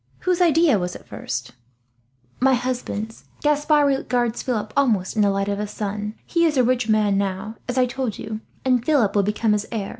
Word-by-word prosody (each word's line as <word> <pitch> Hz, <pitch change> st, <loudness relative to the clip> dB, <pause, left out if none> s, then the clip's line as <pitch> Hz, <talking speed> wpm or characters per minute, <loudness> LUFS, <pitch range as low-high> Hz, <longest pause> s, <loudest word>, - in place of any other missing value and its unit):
Whose 365 Hz, -1 st, +1 dB
idea 325 Hz, -, +4 dB
was 180 Hz, 0 st, -3 dB
it -, -, -11 dB
first?" -, -, -5 dB, 0.9 s
"My 265 Hz, +1 st, +4 dB
husband's. 240 Hz, -3 st, -4 dB, 0.2 s
Gaspard 295 Hz, 0 st, +3 dB
regards 245 Hz, -4 st, 0 dB
Philip 215 Hz, -4 st, -3 dB
almost 220 Hz, -10 st, +1 dB
in 215 Hz, -, +2 dB
the 205 Hz, -, +4 dB
light 195 Hz, 0 st, 0 dB
of 200 Hz, 0 st, -1 dB
a 210 Hz, -, -2 dB
son. 210 Hz, +1 st, -4 dB
He 335 Hz, -1 st, +1 dB
is 310 Hz, -4 st, +2 dB
a 255 Hz, -, +5 dB
rich 245 Hz, -2 st, +1 dB
man 210 Hz, -2 st, +3 dB
now, 200 Hz, +3 st, -3 dB
as 250 Hz, -, -2 dB
I 255 Hz, -, +5 dB
told 250 Hz, -3 st, -3 dB
you, 215 Hz, 0 st, -6 dB, 0.2 s
and 250 Hz, -2 st, +2 dB
Philip 245 Hz, -9 st, +2 dB
will 205 Hz, -, +5 dB
become 210 Hz, +2 st, 0 dB
his 210 Hz, 0 st, -1 dB
heir. 215 Hz, -4 st, -3 dB
225 Hz, 200 wpm, -22 LUFS, 210-265 Hz, 0.9 s, a